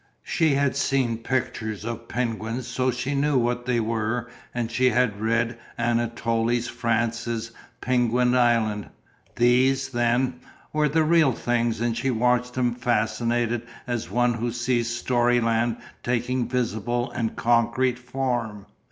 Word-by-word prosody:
She 160 -4 +2
had 140 -1 +1
seen 130 -5 +1
pictures 115 -4 -2
of 115 0 -5
penguins 115 0 -2
so 130 +2 0
she 130 +3 -2
knew 140 0 +2
what 120 0 0
they 125 -2 +2
were 115 +2 -2 0.2
and 120 -1 -3
she 130 +2 +3
had 115 -4 +1
read 115 +1 0 0.2
Anatole 115 0 0
France's 115 -1 -2 0.3
"Penquin 125 0 +2
Island" 110 - +2 0.5
these, 130 +3 +3
then, 120 +1 +1 0.3
were 150 -1 +2
the 160 +3 +2
real 155 -4 +4
things 120 -1 0
and 120 -1 0
she 135 - -1
watched 125 +1 +1
them 125 -2 +1
fascinated 120 0 0 0.2
as 120 -2 -3
one 120 0 +2
who 120 +1 -2
sees 120 0 0
storyland 120 -1 +1 0.2
taking 125 +1 -1
visible 120 0 -1
and 115 -2 -2
concrete 120 +2 +2
form. 120 -5 -3
120 Hz, 130 wpm, -25 LUFS, 115-125 Hz, 0.5 s, real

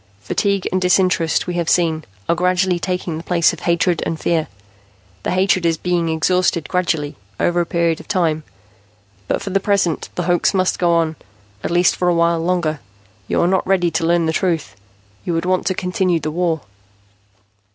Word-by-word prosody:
Fatigue 200 - 0
and 185 +1 0
disinterest, 180 -3 +2
we 180 - -3
have 170 -2 -1
seen, 160 -3 +2 0.2
are - - +3
gradually 180 +1 +1
taking 180 -3 -3
the - - -9
place 170 -2 +2
of - - -8
hatred 170 0 +1
and 160 - -3
fear. 160 -1 0 0.7
The - - -3
hatred 185 0 +2
is 165 -1 +1
being 175 -1 0
exhausted 170 +1 +1
gradually, 165 -5 -1 0.2
over 175 0 +2
a 170 - -3
period 170 -2 0
of - - -13
time. 165 -5 +1 0.9
But - - -1
for 195 - -4
the 195 - +2
present, 195 -5 0
the 175 - -1
hoax 175 +2 +2
must 185 -1 +1
go 175 -1 +3
on, 160 -1 0 0.5
at - - -2
least 175 +1 +3
for 180 - +1
a 175 - +2
while 170 0 +2
longer. 165 -3 0 0.5
You - - +1
are 170 - +3
not 185 0 +1
ready 180 -3 +2
to 160 +1 -1
learn 170 -1 +2
the 160 - 0
truth. 160 - -1 0.5
You 175 - -2
would 165 +1 -1
want 185 0 0
to 185 - +1
continue 180 -1 0
the 155 - -3
war." 165 -1 0
175 Hz, 190 wpm, -19 LUFS, 165-180 Hz, 0.9 s, are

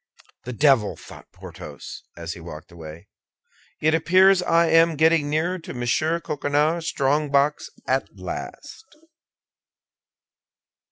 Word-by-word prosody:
"The 125 - -5
devil!" 130 -5 +2
thought - - -14
Porthos, - - -10 0.2
as 85 0 -5
he - - -11
walked 80 0 -10
away, 85 +2 -11 0.7
"it 155 +1 +2
appears 185 +3 +4
I 170 -1 +3
am 165 0 +4
getting 160 -1 +3
nearer 170 +5 -1
to 160 - -9
Monsieur 140 +7 0
Coquenard's 150 +2 -1
strongbox 145 +1 +1 0.2
at - - 0
last." 440 - -8
150 Hz, 110 wpm, -23 LUFS, 125-165 Hz, 0.7 s, appears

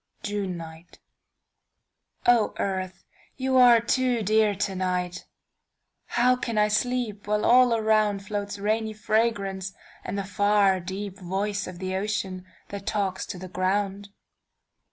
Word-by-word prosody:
JUNE 200 -3 -3
NIGHTO 165 0 -11 1.6
EARTH 185 -1 -3 0.3
you 260 0 +1
are 245 -2 +8
too 245 0 +1
dear 215 0 +3
to 195 0 -2
night, 180 -1 -2 0.8
How 250 +1 +3
can 230 -3 -4
I 210 0 +4
sleep, 215 -2 -1
while 210 0 +1
all 250 +1 +6
aroundFloats 210 -2 0
rainy 215 +2 0
fragrance 205 -3 -1 0.3
and - - -4
the 200 - -1
farDeep 195 -1 +1
voice 195 +2 -2
of 185 -1 -8
the 185 +1 -3
ocean 190 -2 -3 0.2
that 200 -1 -7
talks 195 -3 -1
to - - -6
the 185 +1 -8
ground? 195 +2 -1
205 Hz, 120 wpm, -26 LUFS, 190-215 Hz, 1.6 s, are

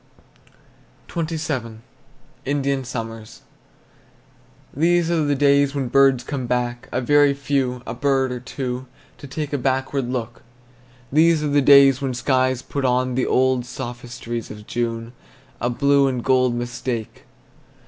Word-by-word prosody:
XXVII. 155 -9 -3 0.7
INDIAN 140 -1 -1
SUMMER. 115 -3 -5 1.5
These 170 +3 +2
are 165 -2 +2
the 145 0 +1
days 140 0 +3
when 135 -3 -2
birds 135 -2 +4
come 130 -2 -4
back, 120 0 -2
A 125 - 0
very 145 +1 +4
few, 135 -3 -1
a 115 - -5
bird 135 0 +1
or 125 - -4
two, 125 0 -5 0.3
To 140 - -9
take 150 +1 -5
a 145 - 0
backward 130 0 -1
look. 120 -2 -4 0.7
These 160 +1 +4
are 150 - 0
the 145 0 +3
days 140 -1 +6
when 130 -2 -2
skies 130 0 +1
put 140 - -4
on 125 0 +1
The 130 +1 0
old, 130 0 +3
old 120 - -6
sophistries 120 -2 -6
of 105 0 -10
June, 115 0 -3 0.5
A 120 - 0
blue 140 +2 +3
and 125 -3 -2
gold 130 -2 +2
mistake. 120 -1 -5
130 Hz, 140 wpm, -22 LUFS, 120-140 Hz, 1.5 s, days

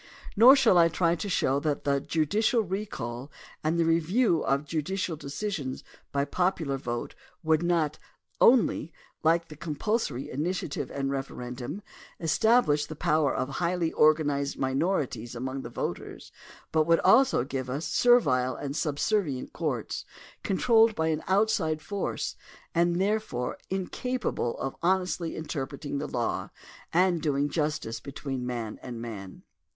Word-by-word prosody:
Nor 245 +6 +9
shaU 250 -9 +5
I 170 -1 +7
try 165 0 +1
to 190 +5 -4
show 140 -6 +2
that 150 -1 -1
the 140 -1 +2
judicial 165 - +1
recall 175 - -5 0.3
and 160 +2 +1
the 165 - +3
review 165 +4 +2
of 140 +2 0
judicial 165 +3 -2
decisions 145 -2 -4 0.3
by 140 0 +1
popular 165 -5 0
vote 120 -2 -4 0.3
would 160 0 +3
not 165 -3 +1 0.4
only, 230 - +4 0.3
like 165 +1 +2
the 155 - -9
compulsorj^ 155 - -2
initiative 155 +2 -3
and 135 -1 -2
referendum, 130 +5 -5 0.4
establish 165 -3 +3
the 155 - -7
power 150 -1 +2
of 130 - -1
highly 170 +3 -1
organized 145 -2 +2
minorities 130 - -1
among 130 +2 -4
the - - -7
voters - - -5 0.4
but 155 0 +2
would 165 0 +5
also 260 - +5
give 130 -1 -4
us 140 +5 -3
servile 130 - +3
and 140 0 -5
subservient 150 -1 -1
courts 140 -9 -3 0.4
controlled 225 +2 +4
by 160 0 0
an 155 -1 0
out 205 +3 +3
side 155 -4 0
force 200 +5 -3 0.4
and 175 +1 +2
therefore 195 - -1
incapable 195 - -2
of 135 - -4
honestly 180 -2 0
inter 150 -4 -3
preting 140 0 -5
the 150 - -3
law 120 -4 -2 0.4
and 175 -1 +3
doing 145 -1 +1
justice 150 -7 -2
between 135 -2 -5
man 115 -3 -4
and 120 -2 -7
man. 100 -5 -8
155 Hz, 140 wpm, -28 LUFS, 135-180 Hz, 0.4 s, Nor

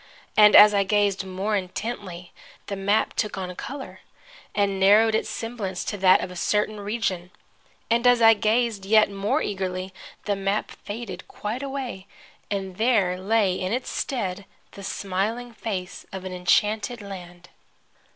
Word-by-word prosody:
And 210 -1 +7
as 210 0 +9
I 200 -1 +3
gazed 200 -1 +1
more 190 +3 -2
intently 185 -2 -5 0.3
the 200 - -4
map 200 +3 +1
took 210 -2 -2
on 180 -1 -5
color, 270 +6 -7 0.6
and 200 -2 +1
narrowed 210 +3 +5
its 220 - 0
semblance 215 -6 -4
to 205 - -4
that 185 -1 +5
of 180 - -5
a - - -9
certain 210 +3 0
region. 200 -4 -2 0.6
And 235 +2 +2
as 245 -1 +5
I 225 -1 +8
gazed 220 -1 0
yet 215 +1 +4
more 200 +1 0
eagerly 185 -1 -3 0.3
the 205 - 0
map 195 +2 -1
faded 205 -4 -8
quite 220 +5 -5
away, 270 -8 -5 0.4
and 190 -2 -4
there 205 -6 +2
lay 200 0 +2
in 185 +2 -2
its 250 +1 -3
stead 200 -7 -3 0.3
the 200 - -11
smiling 210 +6 -3
face 195 -4 -5
of 190 -1 -7
an 185 - -5
enchanted 210 +5 +1
land. 180 -3 -10
200 Hz, 150 wpm, -24 LUFS, 190-220 Hz, 0.6 s, as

